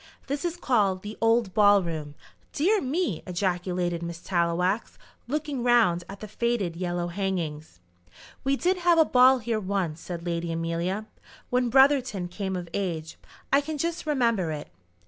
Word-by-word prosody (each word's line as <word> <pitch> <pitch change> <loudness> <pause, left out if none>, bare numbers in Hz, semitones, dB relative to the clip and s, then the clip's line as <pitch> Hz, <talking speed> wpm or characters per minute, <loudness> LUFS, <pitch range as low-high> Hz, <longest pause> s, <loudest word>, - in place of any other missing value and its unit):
This 280 +1 -3
is 345 0 -2
called 205 - +1
the 210 +1 -6
old 225 -3 +2
ball 205 -2 +5
room." 155 -4 -5 0.4
"Dear 395 +8 +2
me!" 265 - -1
ejaculated 180 -1 -1
Miss 170 0 -5
Tallowax, 180 +4 0 0.3
looking 290 -1 -2
round 230 -8 +3
at 195 0 -9
the 215 - -6
faded 210 -5 -1
yellow 175 0 -2
hangings. 170 - -3 0.6
"We 270 +1 +2
did 365 +6 +1
have 350 -1 +3
a 320 - +6
ball 255 0 +6
here 230 -2 -2
once," 185 -5 -2
said 170 -1 -6
Lady 170 -1 -2
Amelia, 170 +5 -2 0.5
"when 250 -1 +2
Brotherton 260 -8 +3
came 190 +1 -4
of 175 -1 -5
age. 165 -5 -3 0.3
I 280 - +6
can 305 +1 -5
just 335 +1 -3
remember 230 - +1
it." 150 -2 -5
200 Hz, 155 wpm, -26 LUFS, 175-255 Hz, 0.6 s, a